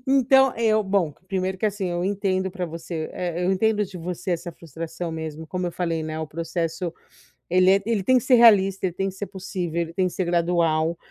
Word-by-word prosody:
Então 265 0 +4
eu 220 -2 +3
bom, 190 -6 0
que 175 - -30
primeiro 190 -1 -2
que, 215 - +1
assim, 205 -2 -2
eu 175 0 -2
entendo 190 -1 0
pra 180 -1 -4
você, 165 -1 -5
eh 175 0 -3
eu 185 - +2
entendo 210 +2 +2
de 190 -1 -10
você 180 +2 -3
essa 175 +1 -3
frustração 165 +2 -6
mesmo. 160 0 -6
Como 180 +2 -3
eu 175 - -4
falei, 165 -2 -2
né, 155 0 -4
o 160 - -3
processo 165 +2 -3 0.6
ele 185 +1 +5
é 195 0 +4
ele 220 -4 0
tem 255 +5 +4
que 245 - 0
ser 260 -1 +5
realista, 195 -5 +5
ele 180 - -1
tem 195 +2 -1
que 190 - -10
ser 205 - -4
possível, 180 -3 -4
ele 165 0 -5
tem 185 +1 +1
que 180 - -6
ser 185 - -1
gradual, 170 -1 +1
180 Hz, 225 wpm, -24 LUFS, 165-195 Hz, 0.6 s, ele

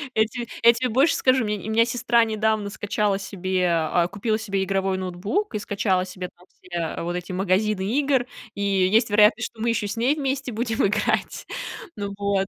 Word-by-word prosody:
Я 220 0 +4
те 240 +1 -6 0.2
я 235 0 +8
тебе 250 +1 -1
больше 270 +8 +3
скажу, 255 -1 +3
у - - -2
меня 210 0 -1
не 205 - -8
у - - -1
меня 230 - +6
сестра 240 -1 +2
недавно 220 -1 0
скачала 205 -1 -1
себе, 185 -2 -1
а, 170 +1 +1
купила 215 +3 -1
себе 195 -3 -1
игровой 195 0 0
ноутбук 185 - -2
и - - 0
скачала 195 -3 0
себе 180 -1 -7
там 180 +1 -21
все 170 -3 -4
вот 175 +1 -3
эти 180 +1 -5
магазины 195 +2 +1 0.2
игр. 270 -4 +2 0.3
И 200 - -5
есть 200 +3 +3
вероятность, 210 +3 +5
что 220 - -12
мы 235 - +1
ещё 215 -2 0
с 200 - -4
ней 255 +6 +2
вместе 270 -3 -2
будем 225 -1 0
играть. 210 +1 -1 0.5
Ну 200 -1 -4
вот. 200 -1 0
210 Hz, 200 wpm, -24 LUFS, 190-230 Hz, 0.5 s, я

